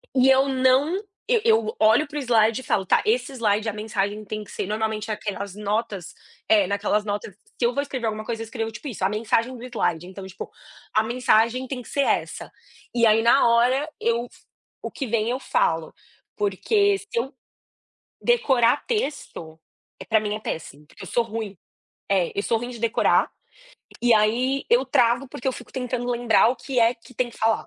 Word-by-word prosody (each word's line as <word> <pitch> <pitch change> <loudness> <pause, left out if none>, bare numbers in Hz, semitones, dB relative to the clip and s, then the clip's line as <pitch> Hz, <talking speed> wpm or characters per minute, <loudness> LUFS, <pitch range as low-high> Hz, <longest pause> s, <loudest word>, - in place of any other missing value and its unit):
e 260 0 +5
eu 265 +1 +5
não, 265 +4 +3 0.3
eu 475 -3 +3
eu 450 0 +2
olho 230 +8 +4
para 295 +1 -7
o - - -1
slide 230 -1 +3
e - - -14
falo: 195 -4 0
"Tá", - - +3
esse 245 +4 +1
slide 215 -2 +1
a 215 - -1
mensagem 210 -1 -2
tem 215 +1 -5
que - - -14
ser - - -3
normalmente 220 0 -2
aquelas 200 -2 -4
notas, 205 -3 -3 0.3
eh 210 -3 +5
naquelas 205 +1 0
notas, 205 -1 -4
se 215 +5 -5
eu 240 - +2
vou 280 - 0
escrever 260 -4 -4
alguma 215 0 -3
coisa 225 -1 -4
eu 225 - -4
escrevo 225 -1 -4
tipo 215 +7 -9
isso, 220 -7 -5
a 190 - +3
mensagem 230 +3 0
do - - -12
slide 175 -8 -2
então 190 +1 -9
tipo, 190 0 -8 0.4
a 215 - +3
mensagem 240 +1 +2
tem 255 -2 -5
que - - -13
ser 280 - 0
essa. - - -1 0.4
E 235 -1 +3
aí 220 0 +5
na 235 +4 +5
hora 245 +5 +3
eu 235 +1 0
f - - -21 0.4
o - - -5
que 275 - -4
vem 225 0 0
eu 250 +2 -1
falo, 165 - 0 0.4
porque 400 - +2
se 395 - -14
eu 250 +5 -1 0.9
decorar 270 - +3
texto, 275 - -4 0.5
para 220 - +4
mim 210 -1 -2
é - - -5
péssimo, 150 -6 -6
porque - - -13
eu - - -8
sou 240 - +1
ruim, 220 -3 -6 0.5
é, 185 -4 +2
eu - - +2
sou 230 - +1
ruim 240 +2 -5
de 240 -2 -8
decorar, 230 0 +2 0.7
e 240 -1 +5
aí 245 +6 +2
eu 245 +3 +4
travo, 245 +1 +2
porque 250 - -8
eu 265 - +2
fico 245 - -11
tentando 250 -1 -3
lembrar 235 -2 +4
o 255 - 0
que 265 -2 -3
é 230 +1 +4
que 230 +2 -18
tem 245 +1 -1
que - - -16
falar. 225 0 +1
230 Hz, 200 wpm, -24 LUFS, 210-255 Hz, 0.9 s, e